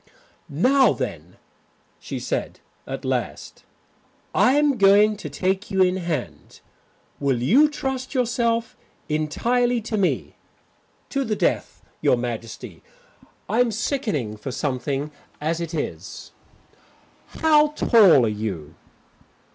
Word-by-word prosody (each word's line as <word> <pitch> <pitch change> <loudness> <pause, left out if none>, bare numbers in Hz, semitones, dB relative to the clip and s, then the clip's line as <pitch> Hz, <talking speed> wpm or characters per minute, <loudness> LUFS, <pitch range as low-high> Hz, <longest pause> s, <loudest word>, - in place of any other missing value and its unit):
"Now 260 - +4
then," - - -6 0.6
she - - -6
said - - -3 0.3
at - - -6
last, - - -4 0.7
"I 255 - +4
am 290 -3 +2
going 205 +2 +5
to 165 -7 -7
take 190 +7 -1
you 190 -2 +3
in 180 0 +1
hand. 170 -8 -5 0.6
Will 135 -4 0
you 255 - +4
trust 265 -2 -4
yourself 235 -2 0 0.3
entirely 240 +11 +1
to 220 0 -3
me?" 190 - -1 0.7
"To 275 -1 -1
the 220 -4 -1
death, - - -1 0.2
Your 125 - +3
Majesty. 115 -2 -6 0.7
I'm 235 +3 +2
sickening 210 - -2
for 105 - -6
something 140 +2 -2 0.3
as 160 +3 -2
it 165 0 -4
is." 150 - -6 1.1
"How 305 -1 +6
tall 215 - +5
are - - +1
you?" 100 -8 -4
195 Hz, 115 wpm, -23 LUFS, -, 1.1 s, How